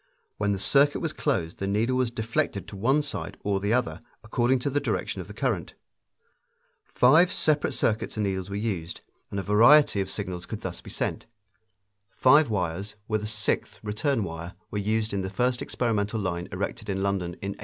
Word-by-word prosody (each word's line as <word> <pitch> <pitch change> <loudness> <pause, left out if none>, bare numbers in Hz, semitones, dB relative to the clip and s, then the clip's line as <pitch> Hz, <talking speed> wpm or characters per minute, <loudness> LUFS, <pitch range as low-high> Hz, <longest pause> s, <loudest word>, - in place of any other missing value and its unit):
When 105 -1 0
the 100 - 0
circuit 140 +8 +4
was 160 -2 -2
closed 95 - -1
the 95 - -2
needle 110 +6 +1
was 130 -2 +1
deflected 110 -3 -2
to - - -9
one 135 +9 +2
side 145 - -5
or 100 -1 0
the 100 +2 -1
other, 115 -10 0 0.2
according 120 +4 +1
to 140 - -1
the 145 - +1
direction - - -2
of - - -10
the - - -9
current. - - -2 1.1
Five 160 - +4
separate 150 -2 +2
circuits 110 0 0
and 105 - 0
needles 95 -1 -2
were 100 - -4
used, 95 -6 -3 0.3
and 100 - -3
a - - -3
variety 115 +3 +6
of 95 - -4
signals 90 -4 -5
could - - -6
thus - - -6
be - - -11
sent. - - -3 0.9
Five 145 +2 +5
wires, 100 0 -2
with 110 -1 0
a 105 - -4
sixth 105 -1 0
return 110 +4 0
wire, 85 0 -6 0.2
were 105 - -2
used 110 +1 0
in 100 - 0
the 95 - -3
first 120 +5 0
experimental 110 -2 -1
line 90 -3 -3
erected 100 +3 -4
in 95 0 -1
London 95 -3 -1
in 100 - -6
1837. 100 - -6
105 Hz, 195 wpm, -26 LUFS, 95-125 Hz, 1.1 s, variety